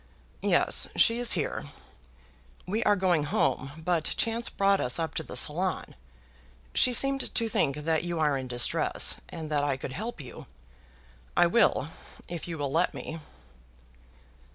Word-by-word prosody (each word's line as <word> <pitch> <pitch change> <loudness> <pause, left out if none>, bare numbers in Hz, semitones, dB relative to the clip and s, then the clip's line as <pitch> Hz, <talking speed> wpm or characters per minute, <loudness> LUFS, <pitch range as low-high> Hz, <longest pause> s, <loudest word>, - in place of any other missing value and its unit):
"Yes; - - +2
she 230 +1 +4
is 245 -2 +4
here. 160 -6 -2 1.0
We 215 +5 -1
are 205 - +5
going 180 -6 +1
home, 140 -1 0
but 170 -3 +1
chance 230 +1 0
brought 195 0 +2
us 125 0 0
up 160 -2 -2
to - - -2
the - - -7
salon. 180 +5 -1 0.8
She 250 - +5
seemed 275 +2 +2
to 230 - +2
think 140 -10 +1
that 155 +1 -1
you 175 -1 -3
are 150 -2 +2
in 130 -1 -4
distress, 120 -1 +1
and 155 -2 -7
that 145 -1 +1
I 140 -2 0
could 135 - -6
help 215 - -5
you. 130 -4 -10 0.9
I - - +6
will, 170 - +2 0.4
if 175 -1 -6
you 165 -2 -5
will 140 -2 -2
let 160 - +1
me." 165 - -6
165 Hz, 155 wpm, -28 LUFS, 145-200 Hz, 1.0 s, I